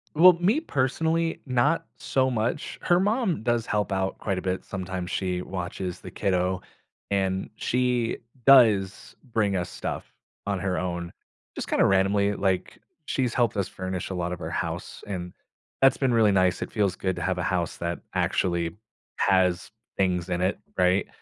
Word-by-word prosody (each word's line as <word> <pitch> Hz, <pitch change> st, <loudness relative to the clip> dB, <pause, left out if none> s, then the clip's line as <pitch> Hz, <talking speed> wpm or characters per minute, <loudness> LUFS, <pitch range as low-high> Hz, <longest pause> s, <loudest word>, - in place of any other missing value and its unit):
Well, 180 Hz, +4 st, +9 dB
me 180 Hz, -, +2 dB
personally, 165 Hz, -, 0 dB
not 140 Hz, +6 st, +2 dB
so 130 Hz, -1 st, +1 dB
much. 120 Hz, +3 st, -2 dB
Her 175 Hz, 0 st, +3 dB
mom 205 Hz, -, +1 dB
does 120 Hz, 0 st, +1 dB
help 105 Hz, -1 st, -1 dB
out 95 Hz, 0 st, -1 dB
quite 100 Hz, -3 st, -2 dB
a -, -, -2 dB
bit. 95 Hz, 0 st, -2 dB
Sometimes 95 Hz, -2 st, -4 dB
she 90 Hz, -2 st, -1 dB
watches 90 Hz, 0 st, -5 dB
the -, -, -9 dB
kiddo, 90 Hz, -1 st, 0 dB, 0.5 s
and 95 Hz, -1 st, 0 dB
she 125 Hz, -1 st, 0 dB, 0.3 s
does 110 Hz, -8 st, +5 dB, 0.2 s
bring 105 Hz, -3 st, +1 dB
us 90 Hz, -1 st, -2 dB
stuff -, -, -4 dB, 0.4 s
on 100 Hz, -1 st, -1 dB
her 90 Hz, -1 st, -1 dB
own. 85 Hz, -1 st, -3 dB, 0.4 s
Just -, -, -5 dB
kinda -, -, +3 dB
randomly, 100 Hz, +1 st, +3 dB
like, 95 Hz, -2 st, -1 dB, 0.3 s
she's 125 Hz, -5 st, 0 dB
helped 120 Hz, -3 st, +2 dB
us 100 Hz, -, 0 dB
furnish 95 Hz, -1 st, -4 dB
a -, -, -3 dB
lot 90 Hz, 0 st, -2 dB
of 90 Hz, -, -7 dB
our 80 Hz, -, -4 dB
house, -, -, -4 dB
and 90 Hz, -3 st, -5 dB, 0.5 s
that's 135 Hz, 0 st, +6 dB
been 130 Hz, -3 st, +1 dB
really 110 Hz, -3 st, +5 dB
nice. 95 Hz, -2 st, +2 dB
It -, -, -4 dB
feels 100 Hz, -4 st, +1 dB
good 95 Hz, -1 st, -1 dB
to -, -, -5 dB
have -, -, 0 dB
a -, -, -1 dB
house -, -, -1 dB
that 85 Hz, 0 st, -3 dB
actually 85 Hz, -2 st, 0 dB, 0.4 s
has 95 Hz, -1 st, +2 dB, 0.3 s
things 90 Hz, -2 st, +1 dB
in 90 Hz, 0 st, -1 dB
it, 95 Hz, +2 st, 0 dB, 0.2 s
right? 90 Hz, +1 st, +3 dB
95 Hz, 170 wpm, -26 LUFS, 90-125 Hz, 0.5 s, Well